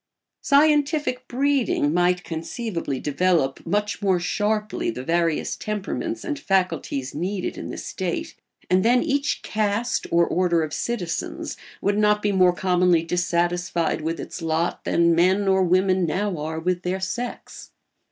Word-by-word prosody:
Scientific 290 -3 +2
breeding 260 - +1
might 180 +1 +2
conceivably 165 - -4
develop 150 -2 +1
much 210 +4 -1
more 190 -3 +2
sharply 210 +4 -1
the 125 +3 -5
various 165 +1 0
temperaments 215 - -4
and 295 -3 -3
faculties 170 - -1
needed 185 +4 -3
in - - -7
the - - -6
state; - - -4 0.3
and 185 +1 +3
then 245 +2 +4
each 285 -2 -1
caste 215 +3 -1
or 170 0 +4
order 175 -2 +1
of 150 -1 -5
citizens 180 -9 -3 0.3
would 205 +1 +1
not 210 0 +3
be 205 - +2
more 185 -2 +5
commonly 180 -1 +2
dissatisfied 175 -1 0
with 165 +2 -3
its - - -7
lot 165 +1 -1
than 170 0 +3
men 185 +4 +3
or 190 0 +4
women 185 0 +2
now 195 +4 -1
are 160 +2 -3
with 175 +1 -1
their 185 +1 -2
sex. 240 +6 -5
185 Hz, 140 wpm, -23 LUFS, 170-210 Hz, 0.3 s, more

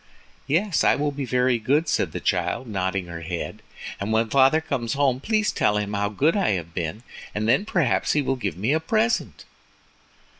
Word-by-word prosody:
"Yes, 170 +4 +1
I - - +4
will 145 0 -1
be 140 -1 -4
very 125 0 +1
good," 145 +9 +1
said - - 0
the - - -4
child, - - -1
nodding 95 -3 -2
her 85 -1 -8
head, 85 +1 -5 0.4
"and 100 +2 -3
when 110 0 +1
father 135 +3 +5
comes 135 -7 -3
home 135 -3 +1
please 215 +7 +1
tell 105 - +1
him 105 0 -2
how 100 0 0
good 145 - +1
I 195 - +2
have 85 -3 -4
been, 90 +7 -4 0.3
and 105 +1 -1
then 130 - +3
perhaps 165 - +1
he 150 - +2
will 135 - 0
give 100 -10 -4
me 110 +9 +1
a 160 - +2
present." 220 +7 -1
125 Hz, 195 wpm, -24 LUFS, 100-150 Hz, 0.4 s, father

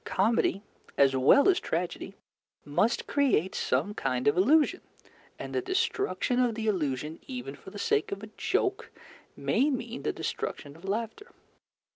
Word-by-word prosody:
Comedy, 200 0 +1 0.3
as 135 -1 +4
well 130 - +5
as 375 -2 +4
tragedy, 175 +3 -3 0.5
must 205 +11 +1
create 255 - +1
some 205 - 0
kind 125 -7 -1
of 145 - +4
illusion, 290 - +3 0.6
and - - -7
the 390 - 0
destruction 375 - 0
of 245 -3 +2
the 220 0 -4
illusion, 155 - -1
even 255 -2 -6
for - - -12
the - - -10
sake 430 -2 0
of 200 +1 -5
a 215 - -8
joke, - - -1 0.5
may 280 +4 +2
mean 245 -3 -4
the - - -1
destruction 145 -1 -5
of 165 +4 -14
laughter. 225 - -3
215 Hz, 150 wpm, -28 LUFS, 165-275 Hz, 0.6 s, well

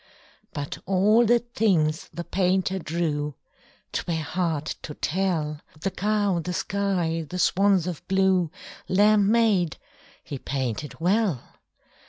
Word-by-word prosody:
But 145 -1 -5
all 210 +5 +4
the 240 +2 +6
things 195 -10 0
the 170 +2 -5
painter 190 +1 +1
drew 155 -4 -2 0.6
'Twere 160 -2 -2
hard 160 -2 -1 0.2
to 150 - -7
tell 160 -4 -1 0.2
The 195 +5 -2
cow, 205 -2 +1
the 180 +2 -4
sky, 175 -5 -1
the 180 - -4
swans 195 -1 +3
of 180 -4 -6
blue, 190 -3 +2 0.4
Lamb, 205 +1 +4
maid, 210 -8 +2 0.5
he 140 - -6
painted 135 +2 -3
well. 185 - +1
180 Hz, 120 wpm, -25 LUFS, 160-200 Hz, 0.6 s, the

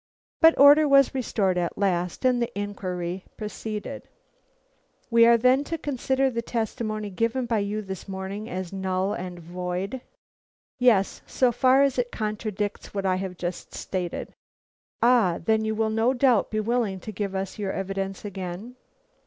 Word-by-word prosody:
But 325 0 +7
order 290 +2 +8
was 275 -1 +5
restored 200 -8 0
at 175 -1 -2
last, 180 +1 -1
and 250 -1 +3
the 235 0 -1
inquiry 185 -3 -4
proceeded. 215 0 -6 1.0
"We 230 0 +6
are 235 0 +6
then 255 +4 +4
to 330 - -3
consider 265 -2 0
the 235 -1 -2
testimony 215 -2 -3
given 230 +6 0
by 230 -2 0
you 205 +1 -2
this 190 -2 -7
morning 195 +2 -5
as 185 0 -5
null 190 +1 -1
and 180 -3 -6
void?" 180 +7 -4 0.8
"Yes, 225 -6 +3
so 255 -2 +2
far 260 +3 +4
as 275 -2 +1
it 245 0 -1
contradicts 210 -2 -4
what 195 -1 -2
I 185 -1 +2
have 185 -1 -5
just 175 0 -5
stated." 180 -2 -4 0.7
"Ah, 230 -8 +4
then 220 0 +2
you 220 0 -1
will 220 0 0
no 225 +4 +2
doubt 245 -4 +3
be 215 - -1
willing 215 -3 0
to 215 - -6
give 200 -1 -4
us 190 +2 -4
your 200 -2 -1
evidence 195 +1 -4
again?" 195 +5 -6
210 Hz, 160 wpm, -25 LUFS, 190-240 Hz, 1.0 s, order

